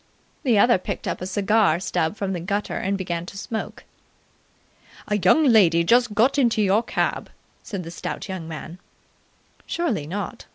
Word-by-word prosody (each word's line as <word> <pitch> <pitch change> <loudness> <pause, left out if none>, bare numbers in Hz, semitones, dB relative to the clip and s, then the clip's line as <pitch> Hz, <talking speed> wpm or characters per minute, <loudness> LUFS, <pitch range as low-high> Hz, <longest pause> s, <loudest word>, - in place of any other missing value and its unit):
the 245 -7 +2
other 235 0 +5
picked - - -5
up - - -3
a 185 - -3
cigar 200 -3 +2
stub 165 -1 -1
from 195 -2 -3
the 180 - -3
gutter 200 +4 -2
and 195 +1 -1
began 175 -3 -3
to 190 +3 -10
smoke. 220 +2 -5 1.2
"A 210 0 0
young 190 - +4
lady 190 - +5
just 240 +3 +3
got 255 +7 +3
into 235 -4 +2
your 205 +1 +3
cab," 235 - -2 0.3
said 195 -3 -6
the 165 - -8
stout - - -5
young 185 -4 -6
man. 165 +2 -8 0.9
"Surely 240 - -2
not?" 195 +3 -5
200 Hz, 165 wpm, -23 LUFS, 180-220 Hz, 1.2 s, other